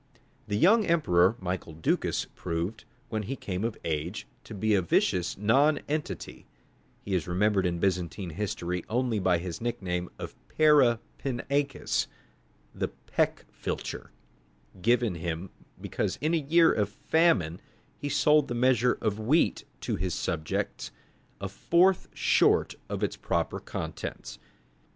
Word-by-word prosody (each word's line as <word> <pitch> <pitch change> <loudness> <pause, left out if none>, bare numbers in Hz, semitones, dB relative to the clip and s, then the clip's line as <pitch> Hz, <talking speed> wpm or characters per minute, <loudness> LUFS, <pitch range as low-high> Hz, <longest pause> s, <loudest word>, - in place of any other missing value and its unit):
The 105 -1 0
young 215 - +5
emperor, 110 - +4
Michael 90 -3 -4
Ducas, 80 +1 0
proved, 85 +8 -3 0.2
when 110 -2 -1
he 120 +6 -4
came 95 -5 -4
of 115 -1 -2
age, 85 +6 -2 0.2
to 110 - -8
be 110 +2 +1
a 100 - +4
vicious 90 +1 +1
nonentity; 145 +7 0 0.6
he 100 - -3
is 90 -3 0
remembered 95 +1 +2
in 85 -1 -1
Byzantine 90 -1 -1
history 90 -1 -3
only 120 -2 +1
by 95 -2 +3
his 85 +2 -5
nickname 90 -7 -2
of - - -6 0.2
Para 145 -7 +6 0.2
pinakes, 140 +1 -1 0.7
the - - -1
"peck - - -2
filcher," - - -4 0.7
given 120 0 +3
him 85 +2 -4 0.3
because - - -2
in 155 +3 0
a - - +4
year 165 +3 +4
of 105 -2 0
famine 105 - +2 0.3
he 145 - -5
sold 150 +1 +4
the 120 - -3
measure 125 0 +3
of 105 -1 -1
wheat 135 +10 +2 0.2
to - - -2
his 90 0 -2
subjects 80 -4 -2 0.5
a 95 - -3
fourth 175 - +3
short - - +3 0.2
of - - -3
its - - 0
proper - - -1
contents. - - -6
105 Hz, 135 wpm, -28 LUFS, 90-135 Hz, 0.7 s, Para